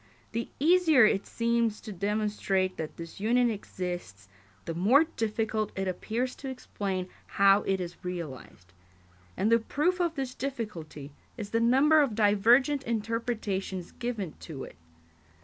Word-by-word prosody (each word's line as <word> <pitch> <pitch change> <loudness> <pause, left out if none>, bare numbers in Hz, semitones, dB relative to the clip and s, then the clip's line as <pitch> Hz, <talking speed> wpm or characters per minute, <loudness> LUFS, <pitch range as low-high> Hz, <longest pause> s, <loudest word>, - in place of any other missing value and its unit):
The 230 +1 -3
easier 320 -5 +6
it 205 -2 +1
seems 230 -2 0
to 220 - -8
demonstrate 200 -1 0
that 160 -1 -5
this 165 +2 -9
union 240 +3 +3
exists, 175 - -6 0.4
the 165 - -3
more 215 - +5
difficult 220 -7 -2
it 190 0 -1
appears 230 +7 -2
to 270 - -6
explain 195 -7 -4 0.3
how 195 +1 +6
it 195 -1 +1
is 175 -1 -7
realised; 145 - -7 0.6
and 215 - +1
the 230 - +6
proof 310 +10 0
of 340 -2 0
this 265 -3 -3
difficulty 210 - -6 0.3
is 210 -3 -6
the 230 - +2
number 270 +7 +5
of 260 -7 0
divergent 230 +7 +4
interpretations 215 -5 -3
given 225 -9 -4
to 150 -5 -7
it. - - -10
215 Hz, 140 wpm, -29 LUFS, 185-245 Hz, 0.6 s, easier